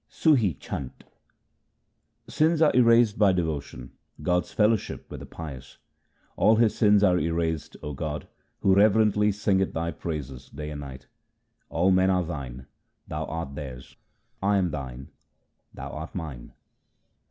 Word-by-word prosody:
Sum 155 -2 +3
Chhant 85 - -3 1.2
Sins 160 +1 +2
are 155 -5 +4
erased 115 -3 +5
by 100 -3 +6
devotion; 75 -7 -3 0.3
God's 90 +1 0
fellowship 110 0 +1
with - - -6
the - - -10
pious: 70 -6 -9 0.3
— - - -39
All 110 +3 +5
his 110 -1 +3
sins 105 -2 +4
are 90 -3 +4
erased, 80 -2 -2
O 75 - -4
God, 75 +2 -4 0.3
who 95 - +4
reverently 105 +1 +4
singeth 100 -2 0
Thy 85 +1 -2
praises 70 -5 -6
day 75 +2 -7
and 75 -1 -6
night. 70 -1 -9 0.6
All 90 +4 +2
men 95 0 +4
are 90 -1 +2
Thine; 65 -6 -6 0.4
Thou - - -3
art 80 -4 -5
theirs; 65 -3 -8 0.5
I 100 +1 +2
am 90 -3 +1
Thine; 65 -2 -6 0.6
Thou - - -8
art 80 +1 -7
mine. 75 -9 -7
85 Hz, 140 wpm, -26 LUFS, 70-105 Hz, 1.2 s, by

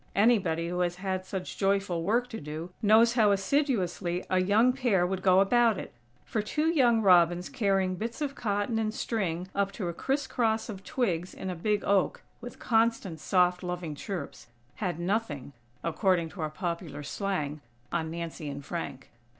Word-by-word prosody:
Anybody 190 -7 +3
who 180 0 -2
has 175 -1 0
had 185 0 -3
such 190 -2 -5
joyful 195 -3 +1
work 230 +8 +1
to 225 - -6
do, 155 +4 -6
knows 225 +2 +5
how 220 -4 +4
assiduously 195 - 0
a 185 0 +3
young 215 +7 +4
pair 235 -9 +2
would 185 +1 -2
go 185 0 +5
about 230 +1 +4
it; - - -7 0.3
for 215 - -1
two 300 +9 -1
young 240 -7 +4
robins 175 -2 +4
carrying 195 -4 +1
bits 230 - -5
of 290 -2 -2
cotton 215 -1 -1
and 215 0 -1
string 185 -6 -2
up 200 0 0
to 185 -5 -3
a - - -4
criss 270 - -1
cross 225 -2 0
of 195 -3 -7
twigs 185 -9 -1
in 190 - -4
a - - -4
big 205 +4 0
oak, 200 - +1 0.2
with - - -8
constant 225 -7 +1
soft, 180 +1 +2
loving 180 -3 -4
chirps, 145 - -6 0.3
"had 180 -5 -2
nothing," 175 - -2 0.3
according 170 0 +1
to 175 - -8
our 155 - -1
popular 170 -3 -4
slang, 155 -4 -3 0.3
on 160 -2 -1
Nancy 165 -2 -5
and 140 0 -7
Frank. 140 -6 -6
190 Hz, 175 wpm, -29 LUFS, 170-220 Hz, 0.3 s, knows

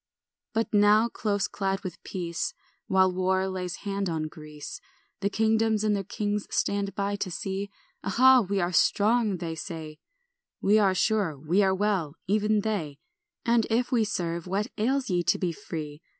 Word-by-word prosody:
ANT. 225 0 +2
1 - - -35
But 210 - +3
now, 210 +3 +5
close 205 -3 -1
clad 195 -1 -2
with 185 -4 -7
peace, 175 -3 -3 0.3
While 190 -1 +4
war 185 +1 +1
lays 185 -2 -3
hand 200 -1 -1
on 160 -2 -1
Greece, 150 -1 -9 0.4
The 200 - 0
kingdoms 220 0 +2
and 210 -1 +2
their 200 - -2
kings 205 +2 -2
stand 200 -1 -1
by 200 0 -1
to 200 - -3
see; 195 +3 -3 0.3
"Aha, 255 +6 +6
we 200 -1 -1
are 175 -1 0
strong," 210 +1 +3
they 165 -1 -4
say, 160 -2 -7 0.6
"We 210 +2 +4
are 195 -3 +3
sure, 200 -7 +1
we 160 +8 +1
are 190 -1 +3
well," 190 -7 0
even 210 +1 +2
they; 180 -10 -2 0.5
"And 235 -1 +3
if 240 +2 +1
we 235 -3 +3
serve, 170 -5 -2
what 200 +3 -1
ails 255 +2 0
ye 175 -1 +2
to - - +2
be 180 -2 -1
free? 155 -5 -7
195 Hz, 175 wpm, -27 LUFS, 175-210 Hz, 0.6 s, Aha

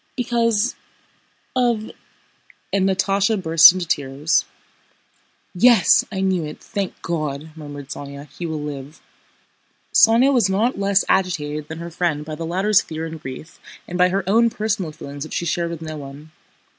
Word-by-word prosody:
because... 235 -2 +1 0.8
of..." 235 -4 0 0.8
and 195 -1 +2
Natásha 195 +3 +1
burst 165 -2 +8
into 185 -1 -4
tears. 145 0 0 1.1
"Yes! 215 0 +5
I 190 -2 -3
knew 190 -3 +1
it! 150 - -7
Thank 200 -4 -5
God!" 155 -2 -3
murmured 145 -3 -9
Sónya. 140 0 -8
"He 175 - -5
will 155 -2 -4
live." 145 0 -7 0.9
Sónya 240 +5 +5
was 235 -7 +3
not 205 +3 0
less 200 -1 +2
agitated 155 -5 0
than 160 - -7
her 170 +1 -7
friend 165 -3 -1
by 155 - -6
the 165 +2 -5
latter's 195 +4 +3
fear 160 0 -6
and 160 -1 -8
grief 135 +3 -9 0.3
and 175 - -6
by 180 0 +5
her 195 +1 -1
own 230 +4 +4
personal 210 -6 -2
feelings 145 -2 -8
which 155 - -7
she 170 - -2
shared 170 +1 -1
with 165 -1 -6
no 155 -1 -6
one. 145 +2 -10
170 Hz, 155 wpm, -21 LUFS, 150-200 Hz, 1.1 s, burst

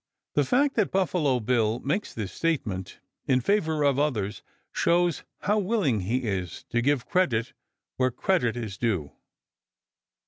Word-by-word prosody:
The 145 - +3
fact 275 - +2
that 210 -4 +3
Buffalo 170 -8 +1
Bill 115 -1 +1
makes 150 +11 -2
this 105 -4 -5
statement 115 - -2 0.3
in 130 -1 +4
favor 160 - +1
of 140 -1 +3
others 110 -9 -1 0.3
shows 175 -1 +2 0.2
how 210 +1 +2
willing 190 - +1
he 115 +8 -1
is 95 -6 -3
to 120 - +2
give 140 -1 +1
credit 135 - +1 0.4
where 130 0 +3
credit 125 -3 0
is 110 -5 -5
due. 95 -12 -1
130 Hz, 140 wpm, -27 LUFS, 110-175 Hz, 0.4 s, in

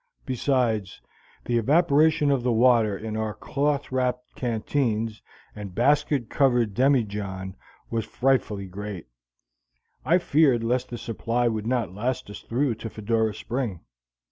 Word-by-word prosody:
Besides, 120 -6 0 0.5
the 120 -1 +1
evaporation 150 +2 +3
of 135 -3 +2
the 125 0 +1
water 115 -3 +4
in 110 +1 -5
our 110 -1 -2
cloth 145 -1 -1
wrapped 125 -1 -1
canteens 115 -2 -1 0.3
and 100 -4 -8
basket 140 0 +2
covered 120 -6 +2
demijohn 105 -7 0 0.4
was 115 -1 0
frightfully 115 -5 0
great; 100 -1 -7 1.0
I 170 - +4
feared 145 -8 +3
lest 125 +2 0
the 120 - -5
supply 115 +1 -1
would 110 -1 -2
not 120 -7 -1
last 115 +1 -3
us - - -8
through 125 +2 0
to 115 - -4
Fedora 110 0 -1
Spring. 115 -8 -3
120 Hz, 130 wpm, -25 LUFS, 110-130 Hz, 1.0 s, water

